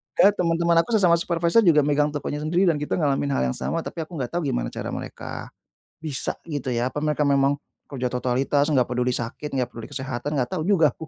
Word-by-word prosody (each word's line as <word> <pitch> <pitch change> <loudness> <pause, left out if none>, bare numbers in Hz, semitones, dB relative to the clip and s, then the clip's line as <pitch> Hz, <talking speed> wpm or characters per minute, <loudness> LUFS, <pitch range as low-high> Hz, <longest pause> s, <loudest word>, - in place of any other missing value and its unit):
Ya 200 - +6
temen-temen 170 -1 +3
aku 225 +7 +1
sesama 175 -5 +4
supervisor 170 +4 +2
juga 165 -9 +5
megang 145 +1 +2
tokonya 145 0 -4
sendiri 165 +5 +1
dan 165 -5 +2
kita 150 - -2
ngalamin 145 -3 +1
hal - - +1
yang - - -4
sama, 165 0 -1
tapi - - -7
aku 165 +2 -5
nggak 130 -5 -3
tau 175 - -1
gimana - - -2
cara - - -5
mereka, - - -6 0.5
bisa 145 -4 -2
gitu 145 -5 -5
ya. 125 0 0
Apa - - -3
mereka 150 0 0
memang 140 0 +3 0.3
kerja 125 -3 -3
totalitas, 130 +3 +1
nggak 130 -6 +2
peduli 125 0 +1
sakit, 130 +5 -4
nggak 125 -2 -1
peduli 115 -1 -8
kesehatan 130 +2 -4
nggak 130 +2 -1
tau 175 -3 -2
juga 165 -7 +4
aku, 160 - -10
150 Hz, 215 wpm, -24 LUFS, 130-165 Hz, 0.5 s, Ya